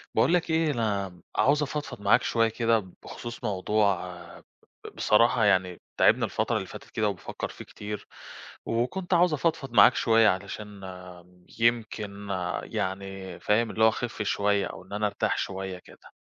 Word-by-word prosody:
باقول - - +4
لك 175 -1 +1
ايه 160 -1 +2
أنا 100 -7 -2
عاوز 145 +2 +3
أفضفض 145 -6 -5
معاك 100 0 +4
شوية 115 -1 +2
كده 115 0 +2 0.2
بخصوص 120 +1 -8
موضوع 100 -2 0 0.8
بصراحة 115 +1 +3
يعني 95 -3 +2 0.2
تاعبني - - +4
الفترة - - -1
اللي - - -2
فاتت - - -11
كده 105 -1 0
وبافكر 100 - -5
فيه - - -10
كتير، 105 0 -7 0.6
وكنت 150 +12 -1
عاوزة 175 -2 +4
أفضفض 140 -4 -1
معاك 120 - +7
شوية 115 -1 +4
علشان 100 +2 -5 0.8
يمكن 110 -3 0 0.4
يعني 95 -1 -5
فاهم 110 +2 +1
اللي 110 - 0
هو - - +7
أخف 120 0 -4
شوية 100 0 +1
أو - - -9
إن 95 - -12
أنا 105 0 +1
أرتاح 100 - -1
شوية 95 -1 -4
كده. - - -18
105 Hz, 150 wpm, -27 LUFS, 100-120 Hz, 0.8 s, معاك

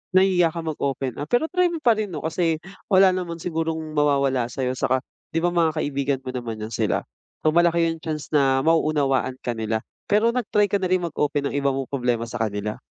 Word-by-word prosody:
Nahihiya 185 -3 +4
ka 165 - -3
mag 155 -2 -4
open 135 -2 -2
up 145 - -4
pero 245 - +1
try 360 0 +3
mo 335 -3 -5
pa 240 - +6
rin 215 -1 -1
'no, 160 -6 -6
kasi 165 0 0 0.2
wala 190 -1 +6
naman 180 -2 -3
sigurong 160 -2 -2
mawawala 140 -4 +2
sa'yo 125 +1 -2
tsaka 130 0 0 0.3
'di 165 - +1
ba, 175 - +2
mga 165 -2 +2
kaibigan 140 -2 -1
mo 130 - -6
naman 115 -4 -5
'yan 110 - -6
sila. - - +1 0.5
So, 155 - +4
malaki 170 +1 +3
yung 165 - -6
chance 155 -2 -5
na 135 -2 +3
mauunawaan 145 -5 +2
ka 120 - -1
nila. 110 -1 -2 0.2
Pero 215 +3 +3
nag-try 210 -4 +1
ka 200 - +2
na 185 - 0
rin 185 -1 +2
mag-open 145 -3 -1
ng - - -5
iba 140 0 +1
mong 135 -1 -4
problema 125 -4 0
sa 115 - -6
kanila? 105 -1 -2
155 Hz, 215 wpm, -23 LUFS, 130-175 Hz, 0.5 s, pa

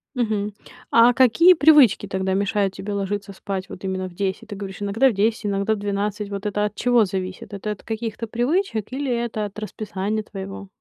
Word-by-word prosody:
Мгм. 215 -4 -1 0.4
А 235 +2 +6
какие 265 +9 +6
привычки 285 - +6
тогда 190 0 -1
мешают 200 0 0
тебе 205 - -6
ложиться 200 0 -3
спать 190 -1 -5
вот 185 - -10
именно 185 -1 -2
в - - -16
10? 195 +4 -3
Ты 205 - -5
говоришь, 195 0 -7
иногда 225 +7 +3
в - - -2
10, 215 +2 0
иногда 200 +2 +1
в - - -3
12. 205 +1 -2
Вот 200 +1 -5
это 210 0 0
от 210 - -4
чего 245 -3 +3
зависит? 185 +1 -5
Это 205 +2 -4
от 210 - -7
каких-то 225 0 -4
привычек 245 - -1
или 275 +1 -3
это 230 -3 -2
от 205 - -9
расписания 215 0 -3
твоего? 195 -1 -8
205 Hz, 195 wpm, -23 LUFS, 195-230 Hz, 0.4 s, А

